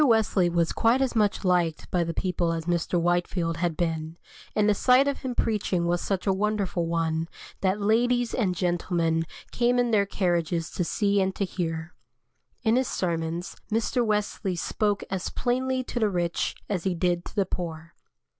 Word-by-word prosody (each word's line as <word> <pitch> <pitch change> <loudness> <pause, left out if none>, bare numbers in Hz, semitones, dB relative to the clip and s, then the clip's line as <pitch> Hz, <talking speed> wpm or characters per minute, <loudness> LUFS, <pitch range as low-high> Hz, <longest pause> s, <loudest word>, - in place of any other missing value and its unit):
Wesley 220 -8 +3
was 170 -1 +1
quite 230 +3 +3
as 265 -2 0
much 210 -2 +1
liked 175 -3 +1
by 175 -1 +2
the 165 - -2
people 175 0 -1
as 165 -1 -4
Mr. 175 0 0
Whitefield 175 -1 0
had 170 -2 -1
been, 160 -1 -2 0.4
and 210 -1 +3
the 210 - +5
sight 255 +6 +4
of 280 - -1
him 255 -2 -4
preaching 200 -7 0
was 175 0 +1
such 195 -2 -2
a 195 - +3
wonderful 200 -3 0
one, 165 -1 0 0.3
that 190 +1 +1
ladies 240 +3 +2
and 190 -7 +1
gentlemen 170 -3 0 0.2
came 245 +1 +2
in 245 -1 +2
their 200 -2 +3
carriages 175 -3 0
to 180 - -1
see 200 +3 +1
and 190 0 0
to 200 - 0
hear. 165 -2 -4 0.7
In 225 +2 +3
his 260 -1 +1
sermons, 170 0 -2 0.2
Mr. 230 +3 +1
Wesley 210 -3 -1
spoke 205 +4 0
as 190 -2 -2
plainly 255 +1 0
to 245 - -4
the 215 -2 +3
rich 175 -3 -1
as 190 -5 -2
he 190 -2 0
did 175 0 0
to - - -10
the 200 - +2
poor. 170 -2 -5
185 Hz, 180 wpm, -26 LUFS, 170-215 Hz, 0.7 s, the